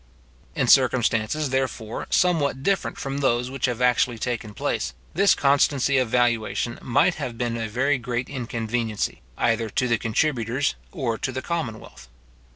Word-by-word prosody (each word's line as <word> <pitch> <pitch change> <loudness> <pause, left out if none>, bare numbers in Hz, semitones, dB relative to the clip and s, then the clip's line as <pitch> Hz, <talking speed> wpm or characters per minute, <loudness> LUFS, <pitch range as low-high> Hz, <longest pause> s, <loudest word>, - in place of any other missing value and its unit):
In - - +1
circumstances, 130 +2 +3
therefore, 125 -4 -2
somewhat 145 -7 +2
different 195 +2 0
from 135 0 -4
those 125 -2 +1
which 135 -2 -1
have 125 0 -2
actually 125 -1 +2
taken 115 -3 -4
place, - - -2 0.2
this 195 +2 +4
constancy 140 -1 +3
of 125 -3 0
valuation 120 -1 0
might 120 - +3
have 120 -2 -4
been 120 -1 -1
a 115 -1 -3
very 135 +5 +1
great 120 +1 -3
inconveniency, 115 -4 -3 0.2
either 115 -1 +1
to 125 +5 0
the 115 -2 +1
contributors 120 +2 0 0.2
or 125 -10 -2
to 135 - -2
the 130 0 -5
commonwealth. 115 - -5
125 Hz, 150 wpm, -24 LUFS, 115-135 Hz, 0.2 s, this